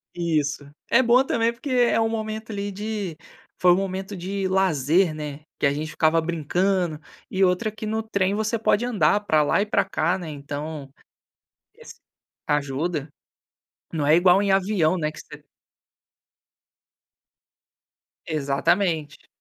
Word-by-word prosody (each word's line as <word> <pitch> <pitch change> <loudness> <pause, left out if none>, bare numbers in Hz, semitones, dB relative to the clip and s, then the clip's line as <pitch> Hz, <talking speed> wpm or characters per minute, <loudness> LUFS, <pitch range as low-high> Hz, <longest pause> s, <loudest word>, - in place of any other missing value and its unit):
Isso. 150 -4 -1 0.2
É 235 - +5
bom 250 +1 +4
também 230 -2 +1
porque 245 +5 -8
é 245 -3 +3
um 225 - +2
momento, 220 0 -4
ali, 200 -1 -4
de 205 -4 -4 0.4
foi 180 - +5
um - - +6
momento 195 +1 -3
de 190 +2 -3
lazer, 175 -2 +2
né, 150 -1 -6 0.2
que - - +1
a 140 - +3
gente 155 +2 -4
ficava 160 +1 +2
brincando. 170 +1 0 0.3
E 190 0 +1
outra 185 +4 +2
que 215 +1 -8
no 220 +1 -1
trem 200 -3 0
você 220 +2 -1
pode 220 +1 +2
andar 205 -5 +2
para 155 -5 +3
lá 175 - +2
e - - 0
para 210 - +1
cá, 165 +4 0
né? 175 -4 -7
Então 145 0 -6 0.9
esse 470 -1 -13 0.5
ajuda. 145 +2 -1 0.8
Não 155 -3 -1
é 155 +2 +6
igual 180 +2 +5
em 200 - 0
avião, 190 -3 +2
né, 155 -2 -1
que - - -13
você - - -13 2.8
Exatamente. 155 +1 -1
180 Hz, 145 wpm, -24 LUFS, 155-210 Hz, 2.8 s, um